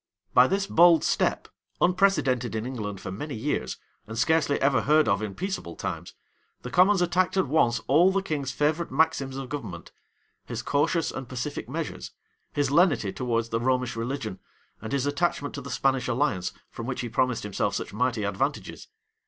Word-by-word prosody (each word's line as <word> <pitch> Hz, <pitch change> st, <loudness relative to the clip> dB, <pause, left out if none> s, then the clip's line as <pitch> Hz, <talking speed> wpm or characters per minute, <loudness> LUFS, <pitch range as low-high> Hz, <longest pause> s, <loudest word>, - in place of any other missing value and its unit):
By 125 Hz, +1 st, +7 dB
this 195 Hz, +4 st, 0 dB
bold 170 Hz, -3 st, +5 dB
step, -, -, 0 dB, 0.3 s
unprecedented 155 Hz, -, +2 dB
in 110 Hz, +1 st, -2 dB
England 105 Hz, -6 st, -5 dB
for 95 Hz, -, -6 dB
many 140 Hz, +8 st, -5 dB
years, 110 Hz, -, -2 dB, 0.3 s
and 110 Hz, +1 st, -7 dB
scarcely 160 Hz, 0 st, +2 dB
ever 135 Hz, -1 st, +3 dB
heard 155 Hz, +1 st, +4 dB
of 100 Hz, +1 st, +2 dB
in 105 Hz, -3 st, -4 dB
peaceable 190 Hz, -, -4 dB
times, -, -, -5 dB, 0.5 s
the 125 Hz, -, -6 dB
commons 185 Hz, +1 st, +5 dB
attacked 180 Hz, +2 st, +1 dB
at 190 Hz, -, +3 dB
once 120 Hz, -5 st, +2 dB
all 170 Hz, +8 st, +5 dB
the 195 Hz, 0 st, 0 dB
king's 145 Hz, -7 st, -2 dB
favorite 150 Hz, +5 st, 0 dB
maxims 140 Hz, -5 st, +1 dB
of 135 Hz, -2 st, -6 dB
government; 105 Hz, -, -6 dB, 0.5 s
his -, -, -5 dB
cautious 150 Hz, +3 st, +1 dB
and 135 Hz, -3 st, -7 dB
pacific 130 Hz, +3 st, -4 dB
measures, -, -, -4 dB, 0.4 s
his 145 Hz, -2 st, 0 dB
lenity 145 Hz, -, +3 dB
towards 115 Hz, -2 st, -1 dB
the 115 Hz, -, 0 dB
Romish 125 Hz, 0 st, 0 dB
religion, 115 Hz, -4 st, -4 dB, 0.4 s
and 110 Hz, -, -6 dB
his 140 Hz, -1 st, 0 dB
attachment 145 Hz, 0 st, -1 dB
to 140 Hz, -, -5 dB
the 140 Hz, -, -8 dB
Spanish 135 Hz, -1 st, +1 dB
alliance, 120 Hz, -8 st, 0 dB, 0.2 s
from 115 Hz, -, -7 dB
which 125 Hz, -, -3 dB
he 120 Hz, -, -3 dB
promised 125 Hz, +1 st, 0 dB
himself 100 Hz, 0 st, -1 dB
such -, -, -4 dB
mighty 120 Hz, -1 st, 0 dB
advantages. 100 Hz, -, -3 dB
135 Hz, 175 wpm, -26 LUFS, 115-155 Hz, 0.5 s, By